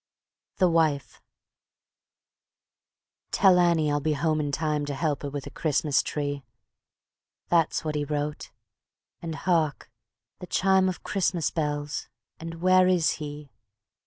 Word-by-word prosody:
The 185 - +4
Wife 155 -7 0 2.1
"Tell 190 -2 +5
Annie 165 -4 +3
I'll 145 - +1
be 155 +2 0
home 155 +1 0
in 145 -1 -1
time 150 0 -1
To 145 - -3
help 150 -1 -1
her 145 - -4
with 140 -1 -5
her - - -8
Christmas 150 -2 +1
tree." 145 -2 -3 1.1
That's 165 -1 +2
what 155 - -1
he 150 -1 -1
wrote, 150 0 -3 0.7
and 165 -2 -5
hark! 160 -8 0 0.5
the 180 - -8
chime 190 0 +3
Of 185 - -6
Christmas 180 -4 0
bells, 150 -2 -3 0.3
and 165 +1 -8
where 185 0 +5
is 180 -3 +2
he? 145 -2 -7
155 Hz, 130 wpm, -26 LUFS, 145-170 Hz, 2.1 s, Tell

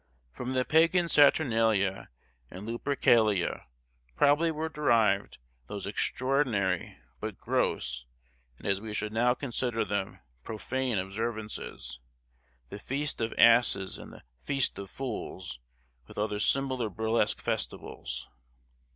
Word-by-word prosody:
From 125 - -5
the 130 -1 +1
pagan 170 +2 +4
Saturnalia 115 - +3 0.4
and 95 +3 -8
Lupercalia 115 - +2 0.5
probably 150 - +4
were 160 0 -2
derived 115 -10 +2 0.3
those - - -6
extraordinary 125 -9 0 0.2
but - - -5
gross, - - -1 0.5
and - - -15
as 100 0 +1
we 110 -1 -5
should 110 0 -2
now 120 +2 +3
consider 120 -3 -1
them, 100 -2 -2 0.3
profane 125 - -2
observances, 100 - -4 0.7
the 100 - -7
Feast 140 +4 -3
of 115 - 0
Asses 115 -5 +5
and - - -10
the - - -14 0.2
Feast 135 - 0
of 100 -1 -7
Fools, 100 - -5 0.5
with - - -13
other 105 0 -1
similar 130 0 +1
burlesque 110 +1 +1
festivals. - - -3
115 Hz, 115 wpm, -29 LUFS, 100-130 Hz, 0.7 s, Asses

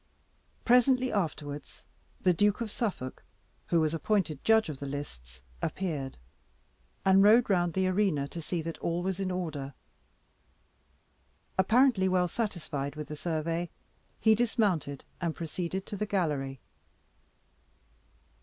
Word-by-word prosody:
Presently 250 +1 +4
afterwards, 150 -6 -3 0.4
the 180 - +3
Duke 205 +4 +2
of 230 -3 -3
Suffolk, 185 - -3 0.4
who 170 - +3
was 155 0 +1
appointed 165 -3 0
judge 220 -2 +4
of 150 -4 -6
the 140 - -5
lists, 65 - -7 0.2
appeared, 150 -8 -3 0.9
and 190 0 +6
rode 215 +3 +6
round 175 -3 +2
the 190 0 +2
arena 185 -7 +1
to 170 - -6
see 165 +1 -3
that 165 0 -5
all 170 +1 -1
was 190 0 -2
in 190 -1 -1
order. 155 -7 -4 1.8
Apparently 220 0 +4
well 180 -1 +3
satisfied 165 -9 -3
with 150 -1 -6
the 150 - -4
survey, 165 +2 -2 0.5
he 220 - +5
dismounted, 205 - 0 0.2
and 170 -2 -1
proceeded 175 +3 -4
to - - -6
the 210 +1 -2
gallery. 145 -9 -1
175 Hz, 125 wpm, -30 LUFS, 150-205 Hz, 1.8 s, and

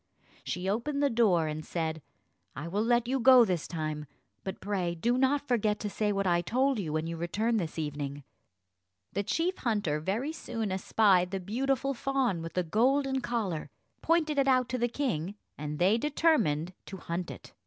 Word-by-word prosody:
She 180 +2 -3
opened 280 +8 0
the 280 - +3
door, 205 -8 +3
and 155 0 -4
said, 160 -2 -3 0.5
"I 150 +5 -5
will 200 +5 -1
let 240 0 +2
you 265 +2 0
go 255 -1 +8
this 180 -6 -1
time; 155 -2 -4 0.4
but 190 - -5
pray 185 -4 -2
do 235 +9 +1
not 270 +2 +2
forget 215 -4 +1
to 210 - -3
say 210 0 0
what 195 -1 0
I 175 -1 +3
told 255 +6 +1
you, 165 -6 -3
when 155 +1 -1
you 165 0 -4
return 215 +8 0
this 170 -6 -3
evening." 145 -2 -4 0.9
The 200 - 0
chief 335 - -1
hunter 205 -11 0
very 220 - -2
soon 225 -9 -4
espied 190 -1 +3
the 195 0 -3
beautiful 270 +7 -1
fawn 260 -8 0
with 165 0 -6
the 180 - +1
golden 265 - +2
collar, 210 -11 -2 0.3
pointed 315 -3 +2
it 275 - +3
out 255 -2 +3
to 255 - -2
the 240 - +2
king, 210 - -2 0.2
and 150 0 -5
they 195 +7 +3
determined 225 - +1
to 195 - -7
hunt 170 0 -4
it. - - -10
205 Hz, 185 wpm, -30 LUFS, 170-255 Hz, 0.9 s, go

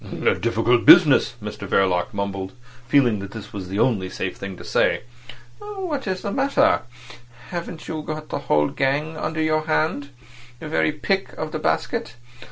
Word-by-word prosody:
"A - - +5
difficult 115 +1 +1
business," 150 -7 +7
Mr 105 -1 -6
Verloc 90 -2 +2
mumbled, 100 -1 -4 0.3
feeling 125 -5 +3
that 100 +1 -8
this 110 -2 -9
was 95 -3 -6
the 95 - -3
only 105 -6 +1
safe 90 0 -4
thing 95 -2 -7
to - - -10
say. - - +1 0.6
"What 375 - -5
is 185 -1 -2
the 200 - -2
matter? 280 +5 +3 0.7
Haven't 170 -2 -6
you 155 -1 -4
the 155 -1 -5
whole 75 - +2
gang 145 +4 -1
under 155 0 -2
your 155 0 0
hand? 155 -2 0 0.5
The 160 - -7
very 155 - +2
pick 195 +6 -1
of 155 -1 -5
the - - -3
basket? 80 +8 -1
145 Hz, 165 wpm, -22 LUFS, 100-160 Hz, 0.7 s, business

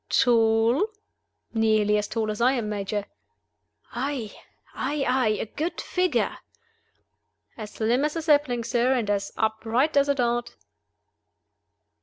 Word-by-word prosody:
"Tall?" 230 - +3 0.7
"Nearly 215 -2 +2
as 210 0 0
tall 220 -2 -2
as 210 - -5
I 255 +3 +4
am, 230 -5 -2
Major." 205 0 -3 0.9
"Aye? 250 -3 -3 0.4
aye? 280 +1 -2
aye? 250 -4 +2
A - - -2
good 310 +10 -4
figure?" 365 0 0 1.2
"As 215 -2 -7
slim 235 +5 +1
as 300 +1 -1
a 330 - -3
sapling, 290 -6 +2
sir, 240 +2 +1
and 220 -5 0
as 200 -1 -1
upright 225 +7 0
as 280 0 +3
a 280 - +3
dart." 240 -2 -1
235 Hz, 130 wpm, -25 LUFS, 220-275 Hz, 1.2 s, I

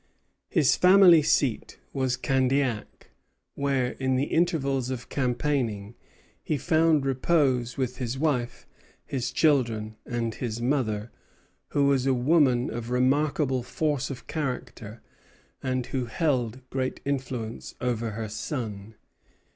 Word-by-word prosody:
His 155 -7 +3
family 180 -3 +7
seat 140 -5 0 0.2
was 130 -2 0
Candiac; 130 -3 -1 0.4
where, 135 -3 0
in 130 -1 +1
the 130 - +1
intervals 140 -6 0
of 120 -3 -5
campaigning, 125 -5 -1 0.5
he 155 - -1
found 160 -2 +2
repose 130 -3 +1
with 130 -2 -2
his 125 0 -3
wife, 130 -5 -1 0.4
his 125 -3 -3
children, 115 -8 +1
and 115 -2 -3
his 115 0 -4
mother, 120 -4 -1 0.6
who 140 - +1
was 135 -2 +2
a 135 - +3
woman 130 -2 +3
of 120 0 -5
remarkable 135 +1 +1
force 145 +2 -1
of 135 -3 -7
character 125 -6 -5 0.6
and 130 -2 -1
who 130 -2 0
held 130 -3 -1
great 130 -1 -2
influence 130 -5 -4
over 120 -2 -1
her 110 -1 -3
son. 110 -2 -5
130 Hz, 120 wpm, -26 LUFS, 120-140 Hz, 0.6 s, family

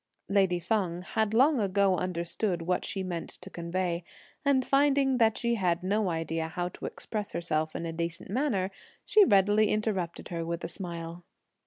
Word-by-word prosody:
Lady 195 -3 +3
Feng 180 -3 -1
had 220 +3 0
long 265 +5 +4
ago 200 -1 +2
understood 175 +1 -2
what 180 +2 0
she 195 - -2
meant 175 -3 -4
to - - -8
convey, 170 0 -2 0.4
and 275 -3 +3
finding 275 -2 +3
that 225 -1 +4
she 235 0 0
had 180 -5 0
no 200 +1 +1
idea 165 -1 -2
how 175 +2 -3
to - - -7
express 210 -2 -5
herself 155 -2 -1
in 170 - -3
a 165 - -4
decent 170 +2 -4
manner, 210 -7 0 0.3
she 430 - +6
readily 205 - +4
interrupted 205 -6 -2
her 170 -1 -3
with 170 +1 -4
a - - -2
smile. 170 -1 -6
185 Hz, 170 wpm, -29 LUFS, 170-215 Hz, 0.4 s, she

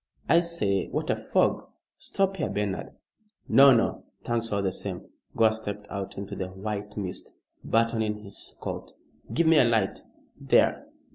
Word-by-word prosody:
"I 165 - +6
say, 135 - 0
what - - -2
a - - +2
fog! - - +1 0.3
Stop 195 0 0
here, 150 - -1
Bernard." 100 -2 -3 0.5
"No! 140 0 +8
No! 115 -3 +2 0.2
Thanks 115 -1 -1
all 100 -1 0
the 95 - +1
same." 95 -1 -6 0.3
Gore 110 -1 +5
stepped 105 -2 -5
out 100 -1 -5
into 100 0 -5
the 95 - -3
white 105 +2 -5
mist, 95 -3 -5 0.3
buttoning 110 -2 0
his 100 -1 -7
coat. - - -6 0.4
"Give 170 - +2
me 160 -1 +6
a - - +7
light. 110 -5 +1 0.4
There! - - +2
105 Hz, 155 wpm, -27 LUFS, 100-115 Hz, 0.5 s, No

